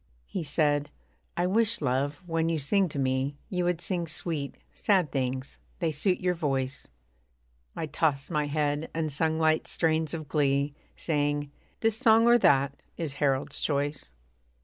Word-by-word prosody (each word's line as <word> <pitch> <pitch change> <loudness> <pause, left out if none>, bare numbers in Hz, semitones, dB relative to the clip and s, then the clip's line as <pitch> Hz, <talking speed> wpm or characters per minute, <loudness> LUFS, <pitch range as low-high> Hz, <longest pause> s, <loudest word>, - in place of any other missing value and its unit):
He 185 - -4
said, 145 -1 +1 0.5
'I 175 - +2
wish, 225 +4 +2
love, 140 +3 -1
when 165 -1 0
you 165 - +1
sing 185 +6 +2
to 145 - -5
me, 135 +1 0
You 180 -2 0
would 175 -2 +1
sing 175 -2 -2
sweet, 150 -3 -2 0.2
sad 185 -8 +2
things 130 0 -3 0.2
they 165 -3 0
suit 180 +5 +1
your 180 -1 +1
voice.' 135 -5 -1 0.9
I - - -2
tossed 150 -1 0
my 150 -2 0
head, 145 +1 -1
and 160 -2 -1
sung 160 +2 0
light 160 0 +2
strains 160 -1 +1
of 155 -2 -6
glee 140 -1 +1 0.2
Saying, 145 -2 -1 0.3
'This 225 -1 +1
song, 225 -2 +5
or 240 0 +6
that, 140 -5 +3 0.2
is 160 -5 -3
Harold's 135 -1 +2
choice.' 145 - -1
155 Hz, 155 wpm, -28 LUFS, 140-170 Hz, 0.9 s, or